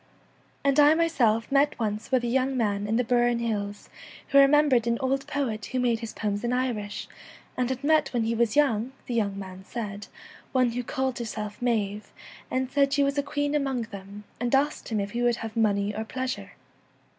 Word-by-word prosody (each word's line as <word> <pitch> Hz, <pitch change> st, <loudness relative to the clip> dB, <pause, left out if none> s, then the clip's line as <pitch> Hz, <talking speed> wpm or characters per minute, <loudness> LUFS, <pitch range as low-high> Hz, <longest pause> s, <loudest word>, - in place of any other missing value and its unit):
And 280 Hz, +1 st, +3 dB
I 295 Hz, +2 st, +7 dB
myself 250 Hz, -10 st, +2 dB
met 285 Hz, +1 st, +3 dB
once 215 Hz, -1 st, -3 dB
with 255 Hz, -2 st, +3 dB
a -, -, 0 dB
young 260 Hz, +2 st, +1 dB
man 205 Hz, -3 st, 0 dB
in 220 Hz, -, 0 dB
the 245 Hz, -, +2 dB
Burren 240 Hz, 0 st, +2 dB
Hills 205 Hz, -3 st, -3 dB, 0.4 s
who 280 Hz, -, +6 dB
remembered 275 Hz, -4 st, +5 dB
an 235 Hz, 0 st, +2 dB
old 270 Hz, +1 st, -1 dB
poet 270 Hz, -8 st, -2 dB
who 255 Hz, -, -2 dB
made 240 Hz, -2 st, +1 dB
his 230 Hz, -2 st, -6 dB
poems 205 Hz, -1 st, -3 dB
in 240 Hz, -, 0 dB
Irish 240 Hz, -5 st, -2 dB, 0.5 s
and 250 Hz, -1 st, 0 dB
had 260 Hz, +1 st, -3 dB
met 305 Hz, -1 st, +3 dB
when 240 Hz, -3 st, 0 dB
he 225 Hz, +1 st, 0 dB
was 230 Hz, -1 st, +1 dB
young, 260 Hz, -4 st, +2 dB
the 245 Hz, -, -4 dB
young 205 Hz, -4 st, 0 dB
man 190 Hz, -1 st, -8 dB
said, 205 Hz, -1 st, -6 dB, 0.5 s
one 255 Hz, -2 st, +3 dB
who 245 Hz, +2 st, -2 dB
called 265 Hz, 0 st, -2 dB
her 235 Hz, -, -3 dB
self 210 Hz, -1 st, -6 dB
Maive, 215 Hz, -4 st, -1 dB, 0.4 s
and 260 Hz, 0 st, -1 dB
said 275 Hz, -1 st, +2 dB
she 285 Hz, 0 st, +3 dB
was 280 Hz, +1 st, +1 dB
a -, -, +3 dB
queen 290 Hz, 0 st, -2 dB
1 295 Hz, 0 st, +1 dB
among 265 Hz, -3 st, -1 dB
them,' 200 Hz, +1 st, -9 dB, 0.2 s
and 245 Hz, +2 st, +1 dB
asked 290 Hz, +2 st, 0 dB
him 220 Hz, -2 st, 0 dB
if 200 Hz, 0 st, -3 dB
he 240 Hz, -, -2 dB
would 240 Hz, -1 st, +3 dB
have 225 Hz, -1 st, -7 dB
money 205 Hz, -2 st, +1 dB
or 220 Hz, -, -2 dB
pleasure. 260 Hz, +3 st, -4 dB
240 Hz, 210 wpm, -26 LUFS, 215-270 Hz, 0.5 s, I